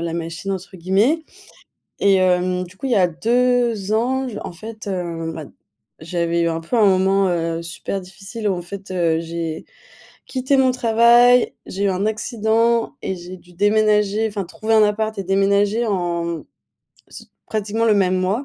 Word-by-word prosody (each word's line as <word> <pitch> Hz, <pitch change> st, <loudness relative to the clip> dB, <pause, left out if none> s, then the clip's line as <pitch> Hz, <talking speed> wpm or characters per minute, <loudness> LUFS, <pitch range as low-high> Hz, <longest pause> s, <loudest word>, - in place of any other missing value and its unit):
la 170 Hz, -1 st, -3 dB
machine, 170 Hz, +3 st, -4 dB
entre 190 Hz, 0 st, -7 dB
guillemets. 205 Hz, -, +1 dB, 0.8 s
Et 200 Hz, -1 st, +4 dB
hem, 180 Hz, -1 st, +2 dB
du 180 Hz, +1 st, -13 dB
coup, 270 Hz, -, -5 dB
il -, -, -2 dB
y -, -, +3 dB
a 185 Hz, -2 st, +4 dB
2 235 Hz, +2 st, +1 dB
ans, 260 Hz, +4 st, 0 dB
j 225 Hz, -4 st, -6 dB
en -, -, -6 dB
fait, 215 Hz, +5 st, -9 dB
heu, 170 Hz, -4 st, -3 dB
bah, 160 Hz, -2 st, -7 dB, 0.5 s
j'avais 170 Hz, +1 st, -1 dB
eu 170 Hz, -, +2 dB
un 165 Hz, -, -2 dB
peu 165 Hz, +9 st, -3 dB
un 215 Hz, -, +5 dB
moment, 190 Hz, 0 st, +3 dB
heu, 165 Hz, -1 st, -1 dB
super 170 Hz, +3 st, -5 dB
difficile 195 Hz, +4 st, -6 dB
où -, -, +1 dB
en 175 Hz, -, -5 dB
fait, 195 Hz, +2 st, -9 dB
heu, 170 Hz, -3 st, +1 dB
j'ai 165 Hz, -1 st, -5 dB, 0.6 s
quitté 260 Hz, +1 st, 0 dB
mon 260 Hz, -1 st, +4 dB
travail, 240 Hz, +1 st, +4 dB
j'ai 200 Hz, +2 st, -3 dB
eu -, -, +3 dB
un 190 Hz, +2 st, -1 dB
accident 225 Hz, +1 st, 0 dB
et 190 Hz, -, -3 dB
j'ai 180 Hz, +1 st, -9 dB
dû 175 Hz, 0 st, -20 dB
déménager, 210 Hz, +2 st, +2 dB
enfin 205 Hz, -2 st, -4 dB
trouver 220 Hz, +5 st, -3 dB
un 215 Hz, -, +6 dB
appart 215 Hz, +1 st, 0 dB
et 195 Hz, -, -3 dB
déménager 200 Hz, +4 st, +2 dB
en 175 Hz, -4 st, -1 dB
mmh 170 Hz, -2 st, -4 dB, 0.6 s
s -, -, -12 dB, 0.2 s
pratiquement 215 Hz, +1 st, -1 dB
le 220 Hz, -2 st, +4 dB
même 185 Hz, -2 st, +2 dB
mois. 195 Hz, +8 st, -1 dB
195 Hz, 180 wpm, -20 LUFS, 175-220 Hz, 0.8 s, un